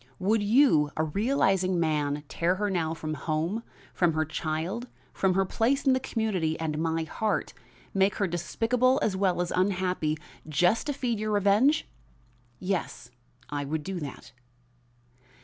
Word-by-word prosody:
Would 210 +3 +1
you, 205 - +4
a 155 - +2
realizing 190 - +1
man, 150 -3 0
tear 170 +5 0
her 205 +1 -1
now 165 -3 -1
from 155 -1 -4
home, 160 +8 -2 0.3
from 175 -3 +2
her 155 0 +1
child, 160 - -3 0.3
from 190 -2 +1
her 195 0 +3
place 250 +9 +1
in 265 - +5
the 260 - +2
community 205 -11 -1
and 155 -2 -2
my 165 0 0
heart 215 +6 -2 0.4
make 195 +1 +2
her 205 - +1
despicable 230 +9 +1
as 200 - +1
well 190 -2 +1
as 175 - -5
unhappy, 180 -4 0 0.3
just 175 - +2
to 290 - 0
feed 245 -5 -2
your 215 0 -2
revenge?" 205 +9 +3 0.7
"Yes, 180 -10 -3 0.4
I 145 -1 -2
would 150 +2 -3
do 190 +1 -4
that." 145 -4 -8
185 Hz, 150 wpm, -28 LUFS, 160-215 Hz, 0.7 s, in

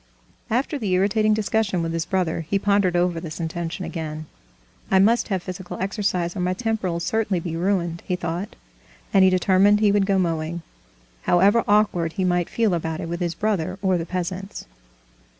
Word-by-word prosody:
After 265 +6 0
the 210 -6 -2
irritating 210 +3 +3
discussion 215 -4 0
with 165 0 -2
his 165 -1 -2
brother, 180 -4 0
he 200 - +2
pondered 200 -2 +2
over 175 -1 +1
this 160 -2 -7
intention 170 +1 -4
again. 155 -2 -5 0.6
"I 190 - +4
must 220 +5 +4
have 190 -4 -2
physical 180 -1 -7
exercise, 190 -3 -1
or - - -4
my 180 +1 0
temper'll 215 -6 -1
certainly 205 +1 0
be 165 -1 -4
ruined," 175 -2 -1
he 180 - 0
thought, 175 +2 -4 0.6
and 195 - +6
he 190 - +7
determined 190 +2 +4
he 210 -1 +4
would 200 -1 +2
go 195 -1 +2
mowing, 165 -1 -1 0.6
however 200 +6 +4
awkward 205 -6 +2
he 190 - -2
might 175 -1 +1
feel 225 -5 +1
about 160 -1 -2
it 165 - -5
with 170 0 -3
his 175 -2 -2
brother 190 -4 -1
or 185 -2 +2
the 165 - -5
peasants. 185 +2 -4
185 Hz, 180 wpm, -23 LUFS, 170-200 Hz, 0.6 s, he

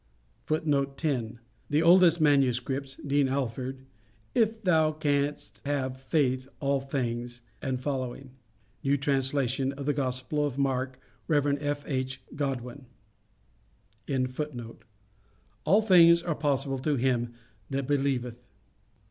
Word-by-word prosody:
[Footnote 140 -3 0
10: 125 -7 -1 0.3
The 150 +2 +2
oldest 170 0 +6
manuscripts. 135 -2 +2
(Dean 140 -1 +2
Alford). 130 0 -3 0.5
"If 225 -1 +1
thou 160 -4 +3
canst 145 -8 -1
have 130 -2 -2
faith 130 -2 +1
All 140 -1 +1
things," 120 -3 -3 0.2
&c. 130 0 -3 0.6
("New 140 0 +2
Translation 135 -1 0
of 140 0 -7
the 145 - +2
Gospel 130 +1 -1
of 145 -3 -1
St 140 +2 0
Mark." 130 -1 -1 0.3
Rev. 145 -2 +2
F.H. 135 -3 -2 0.2
Godwin).] 135 -2 -4 2.8
All 200 +7 +5
things 170 -4 +7
are 170 - 0
possible 140 -2 0
to 145 +2 0
him 120 -2 0 0.3
that 135 0 -2
believeth." 130 -4 -1
140 Hz, 105 wpm, -28 LUFS, 130-145 Hz, 2.8 s, things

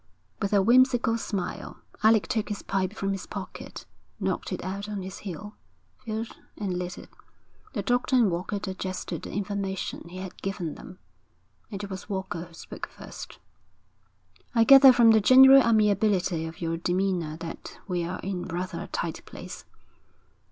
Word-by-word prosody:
With 200 - 0
a 200 -2 +4
whimsical 245 0 +4
smile, 200 -5 -4 0.2
Alec 220 -1 +5
took 220 -2 -1
his 210 - -4
pipe 190 0 -1
from 195 -2 -2
his 195 -1 -4
pocket, - - -8 0.3
knocked - - -2
it - - -4
out 200 +2 -4
on 205 -2 -4
his 190 0 -7
heel, 205 +2 -8 0.4
filled 225 -1 -5 0.2
and 195 -4 -2
lit 180 0 -5
it. - - -11 0.6
The 205 -6 -2
doctor 245 +4 +1
and 230 -7 +4
Walker 180 +4 -2
digested 185 -3 -4
the - - -7
information 195 -3 -3
he 180 - -9
had 185 -1 -8
given 180 -5 -3
them. 180 - -11 0.7
It 200 -1 -5
was 190 +2 -7
Walker 190 -3 -3
who 170 - -18
spoke - - -8
first. - - -10 1.2
'I 230 - +6
gather 270 +1 +9
from 235 -2 +6
the 220 -1 +5
general 265 +4 +9
amiability 205 -7 +2
of 160 +1 -10
your 165 0 -1
demeanour 175 -2 -1
that 165 0 -8
we're 180 -1 -2
in 185 -2 -3
rather 180 +2 -4
a - - -6
tight - - -4
place.' - - -9
195 Hz, 160 wpm, -27 LUFS, 180-220 Hz, 1.2 s, gather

